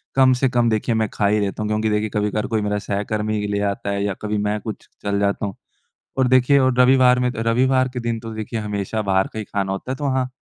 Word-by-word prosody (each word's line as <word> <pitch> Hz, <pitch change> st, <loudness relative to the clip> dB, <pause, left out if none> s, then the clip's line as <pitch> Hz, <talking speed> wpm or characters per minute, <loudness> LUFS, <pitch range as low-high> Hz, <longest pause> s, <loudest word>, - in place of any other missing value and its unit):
कम 130 Hz, -1 st, +5 dB
से 130 Hz, +1 st, +1 dB
कम 120 Hz, -1 st, +2 dB
देखिए, 110 Hz, +1 st, 0 dB
मैं 110 Hz, -2 st, 0 dB
खा 105 Hz, -, +1 dB
ही 105 Hz, +1 st, +2 dB
लेता 100 Hz, +1 st, -2 dB
हूँ। 105 Hz, -, -2 dB
क्योंकि 110 Hz, +1 st, 0 dB
देखिए, 105 Hz, 0 st, 0 dB
कभी-कभार 105 Hz, 0 st, -1 dB
कोई 110 Hz, -3 st, 0 dB
मेरा 105 Hz, 0 st, -1 dB
सहकर्मी 105 Hz, +2 st, -2 dB
ही 105 Hz, -, -2 dB
ले 100 Hz, 0 st, -1 dB
आता 100 Hz, 0 st, -5 dB
है 100 Hz, 0 st, -1 dB
या 100 Hz, -1 st, -1 dB
कभी 105 Hz, 0 st, -2 dB
मैं 105 Hz, +1 st, -1 dB
कुछ 110 Hz, 0 st, -7 dB, 0.2 s
चल 100 Hz, 0 st, 0 dB
जाता 100 Hz, +1 st, 0 dB
हूँ। 100 Hz, -1 st, -5 dB, 0.6 s
और 130 Hz, -1 st, +3 dB
देखिए 130 Hz, +2 st, +4 dB
और 130 Hz, -1 st, +3 dB
रविवार 125 Hz, 0 st, +5 dB
में 125 Hz, 0 st, +1 dB
त -, -, -11 dB
रविवार 130 Hz, +3 st, +3 dB
के 125 Hz, -, -3 dB
दिन 115 Hz, -1 st, -2 dB
तो 115 Hz, 0 st, -8 dB
देखिए, 110 Hz, +1 st, -4 dB
हमेशा 105 Hz, 0 st, -3 dB
बाहर 95 Hz, -2 st, +1 dB
का 110 Hz, -, -4 dB
ही 110 Hz, -, -5 dB
खाना 100 Hz, -1 st, -2 dB
होता 95 Hz, +6 st, -4 dB
है। -, -, -1 dB
तो 145 Hz, +1 st, -3 dB
हाँ, 130 Hz, -1 st, 0 dB
110 Hz, 265 wpm, -21 LUFS, 105-125 Hz, 0.6 s, कम